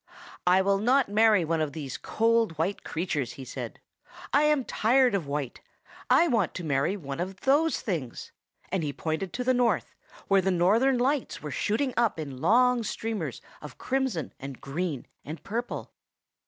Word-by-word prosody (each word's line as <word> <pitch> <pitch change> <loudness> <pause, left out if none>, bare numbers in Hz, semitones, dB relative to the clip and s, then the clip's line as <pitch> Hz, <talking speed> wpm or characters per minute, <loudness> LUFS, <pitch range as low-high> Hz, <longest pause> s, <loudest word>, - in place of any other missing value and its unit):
"I 185 +1 +5
will 195 0 +2
not 250 +3 +3
marry 210 -3 +4
one 160 0 0
of 150 -3 -2
these 140 -4 -5
cold, 225 -6 +1
white 175 +6 -1
creatures!" 155 -7 -2
he 135 - -9
said; - - -7 0.5
"I 295 +2 +5
am 300 -4 +2
tired 250 +2 +3
of 185 -7 -1
white. 140 -3 -4 0.5
I 345 - +5
want 225 - +1
to 180 - -5
marry 150 +6 0
one 140 -4 -6
of 185 +2 -4
those 295 +4 +2
things;" 155 - -4 0.4
and 190 -1 -1
he 145 -2 -2
pointed 160 +6 -3
to 250 - -2
the 255 +1 +3
north, 245 -1 +1 0.3
where 195 -1 +4
the 190 - 0
Northern 215 +9 +3
Lights 265 - -1
were 150 - -5
shooting 245 - 0
up 235 -8 +2
in 140 -4 -6
long 245 +7 +4
streamers 210 - -4 0.2
of 150 -3 -10
crimson 260 - -2
and 135 -1 -7
green 150 -1 -3 0.2
and 155 +3 -8
purple. 235 +4 -4
195 Hz, 170 wpm, -27 LUFS, 155-240 Hz, 0.5 s, I